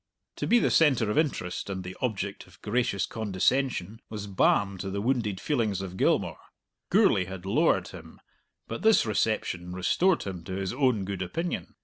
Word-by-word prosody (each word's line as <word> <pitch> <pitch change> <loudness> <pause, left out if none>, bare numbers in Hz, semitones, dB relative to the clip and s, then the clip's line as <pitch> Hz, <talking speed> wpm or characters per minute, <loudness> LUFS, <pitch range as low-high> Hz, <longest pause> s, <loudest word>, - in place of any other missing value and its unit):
To - - -2
be 240 - +5
the - - +2
centre 130 -9 +4
of - - -2
interest 115 - -2
and 95 -1 -4
the 90 +1 -7
object 100 -5 -3
of - - -19
gracious 110 -2 0
condescension 110 0 -1
was 105 -2 -5
balm 100 0 +2
to 95 +1 -4
the 100 +1 -3
wounded 110 -4 0
feelings 115 - 0
of 95 -1 -6
Gilmour. - - +1 0.5
Gourlay 90 - +4
had 95 0 -8
lowered 95 - +2
him, - - -12 0.5
but 115 - -5
this 220 - +5
reception 105 -5 -1
restored 170 - +2
him 90 -4 -6
to 95 - -5
his 95 +1 -2
own 125 -7 +1
good 95 -1 -4
opinion. 165 - -3
100 Hz, 170 wpm, -28 LUFS, 95-125 Hz, 0.5 s, be